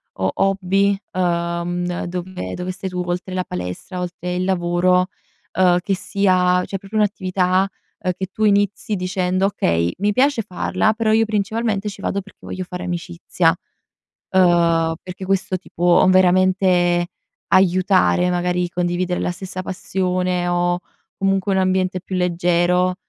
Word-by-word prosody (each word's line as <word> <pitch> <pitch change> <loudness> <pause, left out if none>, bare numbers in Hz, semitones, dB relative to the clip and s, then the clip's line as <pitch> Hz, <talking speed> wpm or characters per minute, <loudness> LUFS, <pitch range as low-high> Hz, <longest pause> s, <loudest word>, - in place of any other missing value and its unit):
ho 95 0 0
hobby, 195 +1 +2 0.2
uhm, 175 0 -1
dove 175 - -5
dove 180 +1 -4
stai 190 +1 -5
tu, 180 -1 -3
oltre 180 +1 -3
la 185 - -1
palestra, 90 - -6
oltre 180 0 -4
il 180 - -1
lavoro, 180 0 +2 0.5
uhm, 180 -1 +4
che 195 +1 -1
sia 180 -2 +2
cioè 195 - -4
proprio 200 +3 -6
un'attività, 190 -2 +1 0.3
uhm, 185 - -1
che 190 - -2
tu 215 - -3
inizi 205 0 +1
dicendo: 185 +1 0
"Okay, 85 - 0
mi 205 +1 +2
piace 265 +2 +2
farla, 185 +1 0
però 220 0 0
io 225 0 +4
principalmente 215 0 -1
ci 200 -1 -10
vado 200 +1 -1
perché 205 - -18
voglio 185 - -5
fare 180 0 -6
amicizia"; 175 -1 0 0.8
uhm, 170 -3 +3
perché 185 +1 -7
questo 190 -1 0
ti 185 - -19
può 175 +1 +4
veramente 185 -1 +3 0.4
aiutare, 185 -1 +3
magari 180 0 0
condividere 180 +1 -1
la - - -1
stessa 185 +1 -6
passione 180 -1 -1
o, 175 0 +1 0.4
comunque, 195 0 +1
un 190 - +1
ambiente 185 0 +1
più 190 +1 -5
leggero, 180 0 +2
185 Hz, 145 wpm, -20 LUFS, 175-190 Hz, 0.8 s, uhm